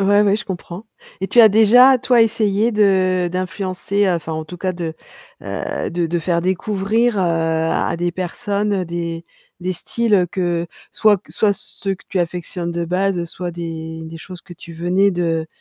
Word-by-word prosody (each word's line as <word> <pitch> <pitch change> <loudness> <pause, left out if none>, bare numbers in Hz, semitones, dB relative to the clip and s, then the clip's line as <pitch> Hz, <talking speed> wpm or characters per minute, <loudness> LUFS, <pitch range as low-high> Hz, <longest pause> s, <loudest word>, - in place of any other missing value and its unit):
Ouais, 205 +1 +4
ouais, 205 -1 +3
je - - -6
comprends 185 +2 -7 0.3
et 190 - -2
tu - - 0
as 220 -2 +8
déjà, 245 +5 +6
toi, 245 -1 +4
essayé 220 0 +1
de 185 -4 +2
d'influencer, 185 +2 -1
enfin 165 -2 -2
en 160 0 -3
tout 180 - -9
cas 185 +1 -2
de, 170 -2 -5 0.5
heu, - - -4
de 170 0 -1
de 170 +1 -1
faire 170 0 0
découvrir, 205 +5 0
heu, - - +2
à 165 -2 0
des 175 0 0
personnes, 200 +2 -2
des 170 -1 -5 0.3
des 185 +1 -2
styles 205 0 +1
que 175 -2 -1 0.3
soit 210 -2 +4
q - - -22
soit 210 -2 +2
ceux 195 0 -4
que 195 - -19
tu 190 - -2
affectionnes 175 0 -3
de 170 0 -2
base, 180 +1 0
soit 175 +1 -5
des 160 -1 -6
des 160 +1 -8
choses 180 +2 -10
que 175 - -13
tu 170 0 -12
venais 180 +4 +2
de 165 -3 -1
185 Hz, 180 wpm, -19 LUFS, 170-200 Hz, 0.5 s, as